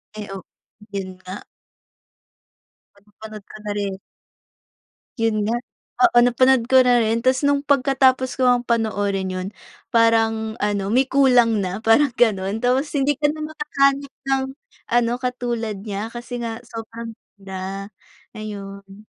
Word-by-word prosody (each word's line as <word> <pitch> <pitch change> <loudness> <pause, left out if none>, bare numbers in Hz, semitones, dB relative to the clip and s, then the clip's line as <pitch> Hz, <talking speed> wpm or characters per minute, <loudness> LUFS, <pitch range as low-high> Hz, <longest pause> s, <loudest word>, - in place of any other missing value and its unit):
Ay, 210 -1 -6
oh, 195 -2 -7 0.5
yun 185 -2 -5
nga. 185 +1 -8 1.5
Parang 200 0 -26
napanood 215 0 -10
ko - - -12
na 210 - -2
rin. 200 -2 -2 1.2
Yun 220 -2 0
nga, 235 - +1 0.5
oo, 350 - +3
napanood 245 0 +3
ko 265 - +6
na 245 -1 +4
rin. 225 +2 0
Ta's 255 +1 +3
nung 285 0 +1
pagkatapos 265 -2 +2
ko 260 - +2
ngang 245 -1 +4
panoorin 205 -4 0
yun, 185 0 -4 0.4
parang 225 -1 +2
ano, 205 0 -1
may 260 +2 +3
kulang 250 -5 +4
na, 190 +1 -3
parang 245 +4 +4
gano'n. 215 -3 +1
Tapos 260 +4 +1
hindi 285 -1 +1
ka 295 - -1
na 310 - -8
makakahanap 280 -2 0 0.2
ng 270 0 +2 0.5
ano, 240 -1 +3
katulad 240 -5 -3
niya, 210 +2 -5
kasi 240 +1 -6
nga 230 0 -5
sobrang 230 -1 -8 0.2
ganda, 195 +1 -6 0.5
ayun. 200 -1 -9
230 Hz, 140 wpm, -22 LUFS, 205-255 Hz, 1.5 s, ko